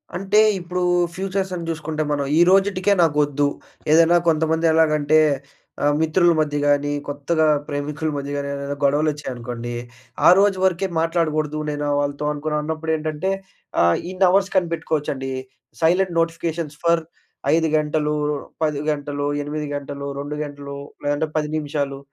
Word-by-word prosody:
అంటే 195 +3 +2 0.2
ఇప్పుడు 180 +1 -4 0.3
ఫ్యూచర్స్ 190 0 -2
సంగతి 170 -2 -4
చూసుకుంటే, 155 -1 -3
మనం 145 -1 0
ఈ - - +7
రోజుటికే 195 0 +3
నాకొద్దు. 145 -2 +2 0.4
ఏదైనా 165 +2 +6
కొంతమంది 160 +1 +1
ఎలాగంటే 155 -1 +3 0.6
ఆహ్, 145 0 +3
మిత్రుల 170 +2 +3
మధ్య 150 -1 0
గానీ, 145 0 +2 0.2
కొత్తగా 145 +3 0 0.2
ప్రేమికుల 150 +1 -3
మధ్య 140 0 -4
గానీ 140 0 -3
ఏదైనా 140 0 -4
గొడవలు 145 +2 +3
వచ్చాయనుకోండి, 120 -4 -6 0.6
"ఆ - - +10
రోజు 200 -1 +3
వరకే 190 +1 +2
మాట్లాడకూడదు 155 -2 0
నేను 145 0 -3
వాళ్ళతో" 145 +1 -2
అనుకున్నాం. 150 +1 -2
అన్నప్పుడు 160 +1 -3
ఏంటంటే 155 +3 -2 0.5
ఆహ్, 85 0 +4
ఇన్ని 185 +1 +2
అవర్స్ 195 +1 +2
కనిపెట్టుకోవచ్చండి. 160 -6 -1 0.5
సైలెంట్ 180 +3 +3
నోటిఫికేషన్స్ 165 -2 -2
ఫర్ 170 0 +3 0.5
5 160 0 +2
గంటలు, 150 0 0 0.5
10 150 -2 0
గంటలు, 145 -1 -3 0.2
8 150 +1 -4
గంటలు, 140 0 -5
2 145 +1 -5
గంటలు, 140 -1 -7 0.3
లేదంటే 145 +2 0
10 150 -1 0
నిమిషాలు 145 -2 -3
155 Hz, 135 wpm, -22 LUFS, 145-165 Hz, 0.6 s, ఆ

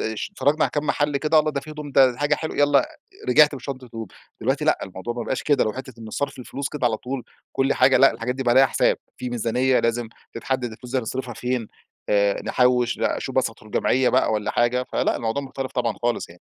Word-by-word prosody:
اشت 110 - -3
اتفرجنا 155 -4 +2
على - - -1
كام 150 0 -2
محل 145 -1 +1
كده، 155 +2 +3
الله! 155 0 +2
ده 140 -2 -3
في 155 - -11
هدوم، 150 -1 -7
ده 130 -2 +5
حاجة 145 0 +2
حلوة، 160 - -5
يالّا، 145 - +4 0.4
رجعت 150 -1 +6
بشنطة 130 -1 -6
هدوم. 115 -2 -7 0.3
دلوقتي 135 +6 0
لأ، 155 - +3
الموضوع 95 +5 -6
ما 120 - -3
بقاش 130 - -2
كدهk - - -6
اللي 145 - +4
هو 110 - -1
حتّة 130 0 -8
إن 110 -1 -8
صرف 140 +2 -3
الفلوس 135 +3 -5
كده 140 -5 -1
على 110 -2 +1
طول 130 +1 -5 0.3
كل 135 +1 +1
حاجة 130 +1 +5
لأ 135 - +7
الحاجات 115 +2 -3
دي 135 - -3
بقى 120 - +2
عليها 135 +2 +6
حساب، - - +2 0.2
في 125 - -5
ميزانيّة 125 +2 +1
لازم 115 0 -1 0.3
تتحدد 120 0 -2
الفلوس 120 +3 -11
دي 130 - +2
هنصرفها 125 +1 -4
فين، 125 -3 -2 0.4
آآ 100 -1 +2
نحوِّش، 125 -1 +2
لأ - - 0
أشوف 135 -1 -5
مثلًا 125 -3 +2
أدخل 110 - -17
جمعية 130 0 +2
بقى 130 -3 +2
والّا 105 -1 -1
حاجة. 125 +1 +1
فلأ، - - +1
الموضوع 115 +5 -2
مختلف 135 -1 -6
طبعًا، 120 -3 0
خالص 120 0 -1
يعني. 85 +1 -16
130 Hz, 230 wpm, -23 LUFS, 115-140 Hz, 0.4 s, لأ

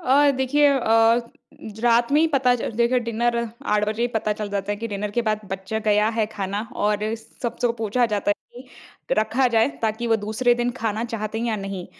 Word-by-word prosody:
अ, 280 +2 +4
देखिए 290 +3 +3
अ, 230 -2 +3 0.5
रात 235 +1 +3
में 300 - +5
ही 325 - +4
पता 260 -4 +3
चल 235 - -3
ज - - -12
देखिए 240 +2 +3
डिनर 235 +1 0 0.4
8 210 0 +2
बजे 220 +2 -2
ही 240 - +1
पता 215 -1 0
चल 210 0 -5
जाता 200 0 -2
है 205 - -3
कि 230 +2 -5
डिनर 205 0 -3
के 240 +3 0
बाद 215 0 0
बच 190 +1 -6
गया 210 0 +3
है 220 -2 +2
खाना 200 +1 -3 0.2
और 210 0 +2 0.4
सबसे 240 0 0
पूछा 230 +3 +1
जाता 205 -2 -1
है - - +3 0.3
कि 255 - -8
रखा 230 +4 +2
जाए 225 +2 +3
ताकि 220 +2 -1
वो 225 -1 +3
दूसरे 220 +4 +1
दिन 240 0 -1
खाना 225 0 -1
चाहते 220 -2 -4
हैं 235 - -2
या 220 -2 0
नहीं। 195 -2 -5
225 Hz, 215 wpm, -23 LUFS, 210-240 Hz, 0.5 s, में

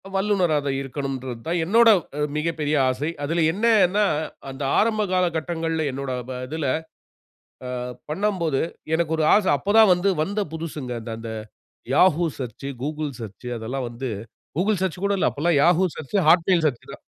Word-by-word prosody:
வல்லுனரா 195 -5 +2
தான் 135 -1 0
இருக்கணுன்றது 130 -3 -5
தான் 175 +1 0
என்னோட 230 +7 +5 0.3
அ - - -1 0.2
மிகப்பெரிய 155 -1 -1
ஆசை. 135 +5 -2
அதில 165 +3 +1
என்னே 225 +6 +2 0.2
ன்னா 210 +2 +3 0.4
அந்த 135 +1 -6
ஆரம்ப 215 -1 +2
காலகட்டங்கள்ல 165 -2 0
என்னோட 135 0 -4 0.2
ப 125 -1 -5
இதில, 155 +2 -3 1.0
அ - - -5 0.4
பண்ணம்போது 170 -4 0 0.3
எனக்கு 160 -1 0
ஒரு 155 - +2
ஆச. 210 - +4
அப்ப 205 - -1
தான் 220 -4 +7
வந்து, 180 +3 +1
வந்த 205 +5 -1
புதுசுங்க, 155 -5 -5
அந்த 115 +1 -7
அந்த 115 0 -6 0.6
Yahoo 175 -2 +4
சர்ச்சு, 130 +1 -6 0.2
Google 150 0 -3
சர்ச்சு, 110 +2 -8
அதெல்லாம் 125 +4 -4
வந்து, 120 +2 -5 0.5
Google 205 +4 +2
சர்ச்சு 185 -1 -2
கூட 200 0 +2
இல்ல. - - +3
அப்பல்லாம் 155 +1 +1
Yahoo 175 +3 +4
church 155 +7 -2
Hot 170 +2 +7
Mail 180 -2 +4
church 125 -6 -2
தான். - - -11
160 Hz, 160 wpm, -23 LUFS, 135-185 Hz, 1.0 s, தான்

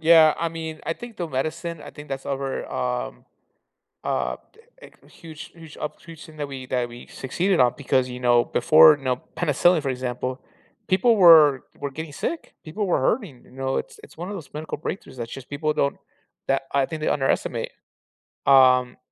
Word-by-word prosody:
Yeah, 160 -1 +6
I 170 - 0
mean, 160 -1 -7
I 165 - -1
think 240 +3 -10
the 175 - -3
medicine 155 +4 -3
I - - -9
think 150 0 -12
that's 135 -1 -5
our, 135 -1 -2 0.2
um 60 -1 -3 0.8
uh 60 -1 -1 0.4
eh - - -12 0.2
eh - - -20
huge 160 -2 -12
huge 160 -2 -13
up 150 0 -6
huge 165 -2 -12
thing 155 -1 -15
that 145 -1 -3
we 135 -2 -7
that 125 -1 -1
we 120 +1 -11
succeeded 175 +7 -1
on 125 -1 +4
because, 130 -2 +1
you 125 0 -7
know, 120 -1 +4
before 155 +2 +6
you 135 - -15
know, 125 -1 0 0.2
penicillin, 175 0 +3
for 135 - -1
example 125 0 -4 0.5
people 220 +5 +4
were 155 -7 +7
were 140 -1 -4
getting 160 +1 -7
sick, 330 - -5
people 195 +6 -3
were 175 - +1
hurting, 160 - -1
you - - -20
know? 135 0 -2
It's 470 -3 -5
it's - - -17
one 175 - -6
of 205 - -5
those 155 -8 -9
medical 155 0 -5
breakthroughs 155 -3 -6
that's 115 -1 -6
just 135 -1 -9
people 150 +2 -1
don't 140 -1 0 0.5
that, 135 0 +1
I 140 -1 +2
think 160 -2 -6
they - - 0
underestimate. 135 -2 -1 0.7
Um 130 -2 +5
145 Hz, 195 wpm, -24 LUFS, 130-165 Hz, 0.8 s, were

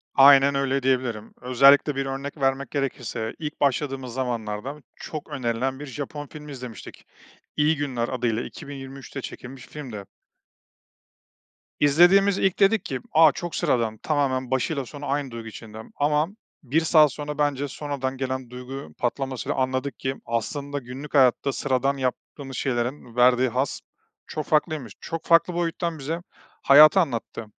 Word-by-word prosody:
Aynen 140 0 +7
öyle 135 -1 0
diyebilirim. 125 -5 -1
Özellikle 140 +3 +5
bir 135 0 -1
örnek 135 +2 -5
vermek 135 0 0
gerekirse 125 -5 -3
ilk 150 -1 -5
başladığımız 135 -2 0
zamanlarda 125 +2 -3
çok 155 -1 -7
önerilen 130 -1 -2
bir 145 - -6
Japon 145 +2 -6
filmi 150 0 -10
izlemiştik. 125 -6 -9 0.5
İyi 150 +2 +3
Günler 130 -5 -2
adıyla 120 -3 -1
2023'te 135 -1 -8
çekilmiş 130 0 -9
filmdi. 120 -10 -8 1.7
İzlediğimiz 175 +7 +5
ilk, 190 -2 +1
dedik 200 0 +4
ki, 130 - -3
“A, 160 -1 +7
çok 175 +5 -6
sıradan, 115 -3 0
tamamen 130 -1 -1
başıyla 135 +2 0
sonu 145 +3 -9
aynı 140 -2 -1
duygu 115 -1 -7
içinde.” 110 0 -9
Ama 150 +2 +2 0.4
1 145 +5 +1
saat 155 -2 +5
sonra, 150 0 -5
bence, 145 -1 0
sonradan 135 -2 -4
gelen 130 -1 -3
duygu 125 - -8
patlamasıyla 130 +1 -2
anladık 130 0 -1
ki 130 0 -2
aslında 140 +5 -3
günlük 130 +3 -9
hayatta 135 0 +4
sıradan 135 0 0
yaptığımız 135 0 -4
şeylerin 125 -1 -2
verdiği 125 +1 +4
haz 130 +3 -2 0.5
çok 155 - -4
farklıymış, 150 - 0
çok 165 0 -5
farklı 170 +1 +4
boyuttan 170 -1 -2
bize 160 +5 -3 0.4
hayatı 150 +6 +8
anlattı. 120 -7 -2
135 Hz, 135 wpm, -24 LUFS, 125-145 Hz, 1.7 s, hayatı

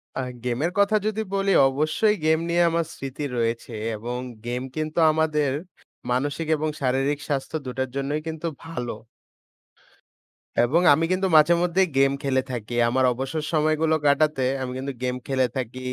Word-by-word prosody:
আ - - -2 0.2
গেমের 125 +8 -1
কথা 200 +2 +4
যদি 215 0 -1
বলি, 195 0 +1 0.2
অবশ্যই 155 +10 +1
গেম 160 0 +4
নিয়ে 170 +1 +3
আমার 165 0 0
স্মৃতি 135 +2 -6
রয়েছে 115 0 -2 0.2
এবং 120 +3 -5 0.3
গেম 120 +1 -2
কিন্তু 155 +1 -2
আমাদের, 155 -3 +1 0.6
মানসিক 145 +5 -1
এবং 155 +1 -1
শারীরিক 135 +2 +1
স্বাস্থ্য 140 +1 -2
২ - - -4
টার 130 0 -1
জন্যই 140 +2 -1
কিন্তু 160 +1 -4 0.2
ভালো। 125 -7 -4 1.7
এবং 155 +9 +3
আমি 160 +3 +2
কিন্তু 190 +1 +1
মাঝেমধ্যেই 170 +4 +4
গেম 135 0 +5
খেলে 130 -1 +2
থাকি। 120 -1 -5 0.2
আমার 130 +2 +1
অবসর 135 +5 -3
সময়গুলো 155 0 +2
কাটাতে, 145 0 +3 0.2
আমি 130 -1 -3
কিন্তু 135 +1 -4
গেম 125 0 0
খেলে 130 -1 +2
থাকি 130 0 -4
145 Hz, 150 wpm, -24 LUFS, 130-160 Hz, 1.7 s, গেম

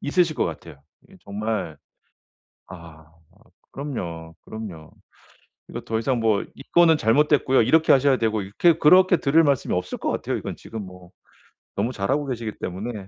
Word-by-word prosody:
있으실 165 +2 +1
것 - - +1
같아요. 70 - -9 0.2
이게 190 0 -20
정말 105 -5 -4 0.9
아 85 -4 -13 0.7
그럼요, 85 - -6
그럼요. 100 -8 -9 0.8
이거 - - -7
더 110 0 -3
이상 125 +1 -1
뭐 110 -3 +1
"이 135 - -12
건은 170 -2 +5
잘못됐고요. 135 +2 +3
이렇게 155 +8 +3
하셔야 135 -1 +4
되고." 110 -2 0
이렇게 145 - +2
그렇게 180 +3 +5
드릴 155 +3 +3
말씀이 140 -4 0
없을 90 - -3
것 - - -2
같아요. - - -3
이건 - - -6
지금 110 -2 -8
뭐 90 -1 -14 0.6
너무 110 +5 -1
잘하고 130 +7 -1
계시기 115 -4 -4
때문에. 100 +2 -6
115 Hz, 335 characters per minute, -23 LUFS, 95-145 Hz, 0.9 s, 건은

